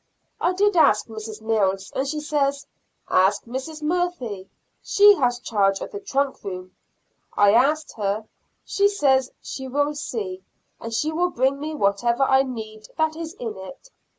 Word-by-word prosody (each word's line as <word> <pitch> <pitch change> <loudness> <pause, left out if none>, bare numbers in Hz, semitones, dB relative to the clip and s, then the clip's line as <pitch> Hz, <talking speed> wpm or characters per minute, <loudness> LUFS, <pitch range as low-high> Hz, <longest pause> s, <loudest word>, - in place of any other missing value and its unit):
I 355 - +1
did 410 +1 +2
ask 215 -10 +5
Mrs. 220 0 -8
Mills, 195 -3 0
and 270 - 0
she 300 +2 -3
says, 280 -2 0 0.4
"Ask 190 +2 +3
Mrs. 265 +6 -6
Murphy, 300 - -2 0.3
she 410 0 +6
has 245 -2 +1
charge 200 -5 +1
of - - -6
the 410 - -5
trunk 280 -8 -1
room." 185 -2 -7 0.6
I 205 0 +6
asked 295 +6 +2
her; 210 +1 -1 0.4
she 400 0 +3
says 270 -10 +2
she 265 -1 -6
will 290 +3 0
see, 200 -10 -5 0.4
and 230 - -6
she 300 +7 0
will 350 +3 +1
bring 265 -1 +1
me 310 +2 -4
whatever 235 +3 +1
I 265 0 +5
need 220 -5 -6
that 315 0 +1
is 330 0 -6
in 230 - -5
it. 230 - -11
265 Hz, 160 wpm, -23 LUFS, 215-305 Hz, 0.6 s, she